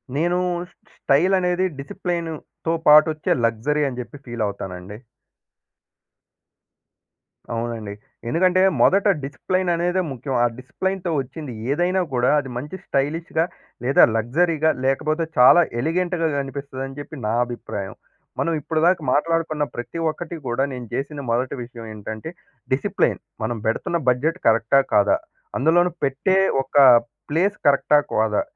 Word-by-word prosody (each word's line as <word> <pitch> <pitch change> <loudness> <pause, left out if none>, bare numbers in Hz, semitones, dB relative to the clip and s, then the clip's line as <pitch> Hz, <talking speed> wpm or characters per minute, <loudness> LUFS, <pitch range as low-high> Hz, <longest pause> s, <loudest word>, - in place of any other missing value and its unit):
నేను 175 +4 +1 0.3
ష్ - - -27 0.2
స్టైలనేది, 180 +4 +2
డిసిప్లిన్‌తొ 165 +1 -4
పాటొచ్చే 155 +1 +5
లగ్జరీ 120 +7 0
అని 125 -1 -7
చెప్పి 120 +4 -10
ఫీల్ 120 -2 -3
అవుతానండి. 95 0 -7 2.6
అవునండి. 115 -3 -4 0.4
ఎందుకంటే 185 +5 +3 0.2
మొదట 195 +2 +4 0.2
డిసిప్లైన్ 185 +7 -2
అనేదే 175 +2 0
ముఖ్యం. 130 +1 -4
ఆ - - +5
డిసిప్లిన్‌తొ 180 +7 -3
వచ్చింది 135 +1 -6 0.2
ఏదైనా 180 +5 +1
కూడా 125 0 +2
అది 135 -2 -6
మంచి 145 +8 -6
స్టైలిష్‌గా 160 +4 0 0.4
లేదా 135 +2 +5
లగ్జరీగా 155 +7 +2
లేకపోతే 155 +4 +1
చాలా 125 +8 +8 0.2
ఎలిగెంట్‌గ 170 +4 -1 0.2
కనిపిస్తదని 135 0 -6
చెప్పి 145 - -8
నా 110 - 0
అభిప్రాయం. 100 -5 -6 0.4
మనం 165 - +1
ఇప్పటిదాకా 165 +4 +2
మాట్లాడుకున్న 160 0 0
ప్రతి 120 +5 -6
ఒక్కటి 170 +2 -6
కూడా 120 +2 0
నేను 125 -1 -6
చేసిన 145 +3 -3
మొదటి 125 +2 0
విషయం 120 -1 -10
ఏంటంటే, 110 +5 -7 0.4
డిసిప్లైన్, 130 +1 +1 0.2
మనం 115 +1 -2
పెడుతున్న 115 +9 0
బడ్జెట్ 150 +8 +1
కరెక్టా? 115 +4 +4
కాదా? 100 - +4 0.4
అందులోను 175 +6 +3
పెట్టే 145 +8 +1 0.2
ఒక 135 - -13 0.5
ప్లేస్ 185 +7 +1
కరెక్టా? 145 +1 +4 0.2
కాదా? 110 -1 +2
145 Hz, 120 wpm, -22 LUFS, 120-170 Hz, 2.6 s, చాలా